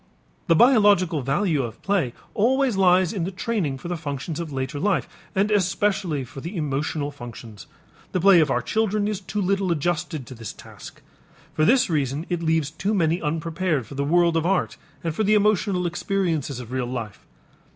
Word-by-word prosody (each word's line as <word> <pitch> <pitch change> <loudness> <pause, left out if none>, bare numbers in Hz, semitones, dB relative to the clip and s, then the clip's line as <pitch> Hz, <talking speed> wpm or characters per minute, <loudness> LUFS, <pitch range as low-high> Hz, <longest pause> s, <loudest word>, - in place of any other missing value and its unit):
The 165 - +5
biological 205 - +4
value 150 +4 +1
of 120 -3 -6
play 195 -11 +1 0.2
always 255 +2 +2
lies 185 -1 +4
in 190 -5 -2
the 180 - -2
training 190 - -2
for 135 - -8
the 175 - -2
functions 155 0 -5
of 165 -3 -5
later 135 +2 -3
life, 195 +2 +1 0.3
and 200 +2 +2
especially 195 -5 +1
for 135 +2 -10
the 175 +6 -6
emotional 145 0 -2
functions. 120 -5 -10 0.4
The 185 - 0
play 190 0 +6
of 155 -3 +3
our 125 -2 0
children 215 - 0
is 210 -3 -2
too 205 +2 -4
little 195 -1 +1
adjusted 160 -3 -2
to 130 - -10
this 115 -3 -7
task. - - -13 0.5
For 155 - +2
this 260 +5 +4
reason 145 -1 -1
it 175 -2 -1
leaves 160 -3 +1
too 195 +7 -1
many 170 -1 +1
unprepared 165 -2 -1
for 125 - -11
the 140 +1 -2
world 170 +3 +3
of 165 - +2
art 185 +2 0 0.3
and 165 -2 -1
for 215 - -1
the 215 +1 +4
emotional 200 -3 +2
experiences 170 -6 -1
of 125 -1 -9
real 130 -1 -2
life. 120 -5 -6
170 Hz, 185 wpm, -24 LUFS, 145-195 Hz, 0.5 s, play